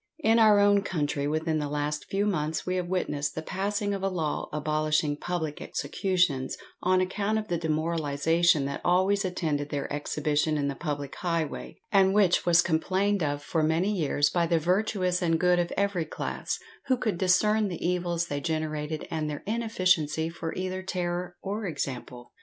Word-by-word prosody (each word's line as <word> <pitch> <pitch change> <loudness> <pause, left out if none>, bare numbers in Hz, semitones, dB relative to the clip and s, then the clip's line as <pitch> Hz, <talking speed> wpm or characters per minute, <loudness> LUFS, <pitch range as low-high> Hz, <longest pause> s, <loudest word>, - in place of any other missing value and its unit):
In 225 -1 +5
our 215 -2 +6
own 205 0 +5
country 150 -7 -1
within 155 +1 0
the 145 -1 -2
last 150 +1 -2
few 200 +1 0
months 160 -6 -1
we 185 - -1
have 180 -1 -2
witnessed 150 -5 -1
the 160 - -4
passing 200 +3 -1
of 195 - -3
a 195 - +1
law 165 -5 -2
abolishing 150 0 0
public 160 -1 -3
executions, 175 -9 0 0.2
on 185 +1 +3
account 200 +3 0
of 215 -1 -4
the 175 - +1
demoralization 160 -1 +1
that 140 0 -4
always 190 +3 +3
attended 155 -6 -2
their 145 -1 -2
exhibition 150 +1 0
in 140 -1 0
the - - -2
public 145 -3 -4
highway, 165 -4 -3
and 195 -1 +4
which 190 -4 +3
was 175 0 +6
complained 190 +4 +1
of 145 -1 -1
for 160 +2 0
many 160 +6 +2
years 145 -6 +1
by 170 0 +1
the 170 0 +3
virtuous 185 +1 +1
and 165 -2 +2
good 180 0 +3
of 175 0 -1
every 200 -5 +1
class, - - -4 0.3
who 260 -1 +3
could 215 -7 -2
discern 210 +3 +3
the 175 -2 -3
evils 175 -1 0
they 145 -4 -3
generated 155 -1 -3
and 155 -2 -1
their 145 - -5
inefficiency 185 -8 +1
for 165 -1 -5
either 185 0 -3
terror 180 -1 -3
or 205 +1 -3
example! 125 -5 -5
170 Hz, 175 wpm, -28 LUFS, 150-190 Hz, 0.3 s, our